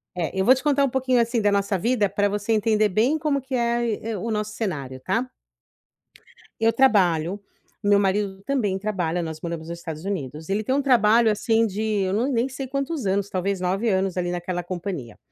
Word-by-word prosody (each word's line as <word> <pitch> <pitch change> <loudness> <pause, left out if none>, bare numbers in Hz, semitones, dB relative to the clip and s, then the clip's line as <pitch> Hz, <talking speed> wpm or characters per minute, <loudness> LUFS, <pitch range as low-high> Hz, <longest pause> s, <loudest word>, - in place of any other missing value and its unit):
É, 170 -3 -2
eu - - +3
vou 255 +6 +6
te 260 - -6
contar 285 -1 +3
um 275 - +2
pouquinho, 255 -1 +2
assim, 235 0 0
da 205 -1 +3
nossa 200 0 +1
vida 215 +1 +1
pra 205 +1 +1
você 205 +2 -2
entender 215 0 +2
bem 230 +11 +2
como 295 -3 0
que 265 +1 -9
é 235 -1 +1
aí 235 -3 -1
é 225 -1 -4
o 225 +4 -3
nosso 210 0 -2
cenário, 140 - -4
tá? 230 - -1 1.3
Eu 225 0 +3
trabalho, 190 -8 +3 0.4
meu 205 0 +4
marido 195 0 0
também 220 -9 0
trabalha, 180 -5 -1
nós 160 -2 -5
moramos 165 -1 -5
nos 170 0 -6
Estados 160 -2 -7
Unidos. 160 -5 -4
Ele 205 +2 0
tem 260 - 0
um 285 - +2
trabalho, 235 -4 +4
assim, 225 +2 +2
de 205 +1 -4 0.2
eu 190 0 -1
não 230 +6 +1
nem 240 0 +1
sei 265 0 -6
quantos 275 0 -3
anos, 200 +1 0
talvez 190 +1 -1
9 195 +5 0
anos, 190 -2 0
ali, 175 -1 -1
naquela 175 0 -3
companhia. 175 - -5
205 Hz, 210 wpm, -24 LUFS, 185-235 Hz, 1.3 s, vou